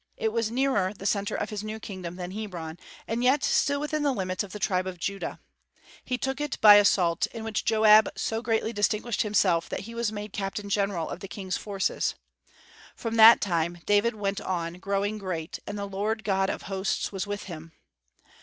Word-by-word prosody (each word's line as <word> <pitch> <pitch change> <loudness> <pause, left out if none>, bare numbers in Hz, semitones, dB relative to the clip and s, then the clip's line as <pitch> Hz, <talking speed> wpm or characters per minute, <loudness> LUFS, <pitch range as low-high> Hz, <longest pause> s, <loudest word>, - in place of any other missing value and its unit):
It 220 -1 -1
was 230 -2 0
nearer 235 -6 +1
the 195 - -10
centre 200 0 0
of 210 - -3
his 210 -1 -4
new 215 +1 -5
kingdom 185 -5 -7
than 180 0 -6
Hebron, 175 -6 -6 0.3
and 230 +2 -1
yet 270 +3 +3
still 285 0 +2
within 300 +1 -2
the 290 -1 +2
limits 185 -5 -2
of 200 - -10
the 210 - -6
tribe 185 -2 0
of 185 -1 -5
Judah, 195 +3 -4 0.6
He 250 - -2
took 265 +2 -3
it 295 -3 -3
by 210 -1 +9
assault, 180 -4 +3
in 225 -2 -8
which 220 -1 -2
Joab 215 -1 +6
so 225 0 -2
greatly 225 0 0
distinguished 210 +2 0
himself 190 -5 +2
that - - -3
he 230 +3 -9
was 235 -2 -1
made 210 -1 -6
captain 200 +1 -4
general 200 -5 0
of - - -6
the 195 - -7
King's 190 -1 -4
forces. 200 -2 -1 0.8
From 230 -1 -4
that 225 +1 +9
time 170 -3 0
"David 205 +3 +3
went 200 -1 -2
on 175 -1 -3
growing 200 +2 -1
great, 170 -5 -4
and 205 - -4
the 200 - -3
Lord 210 +3 -2
God 195 -2 +1
of - - -4
Hosts 195 0 -2
was 195 0 -4
with 205 0 -4
him." 165 -3 -9
205 Hz, 200 wpm, -27 LUFS, 190-220 Hz, 0.8 s, by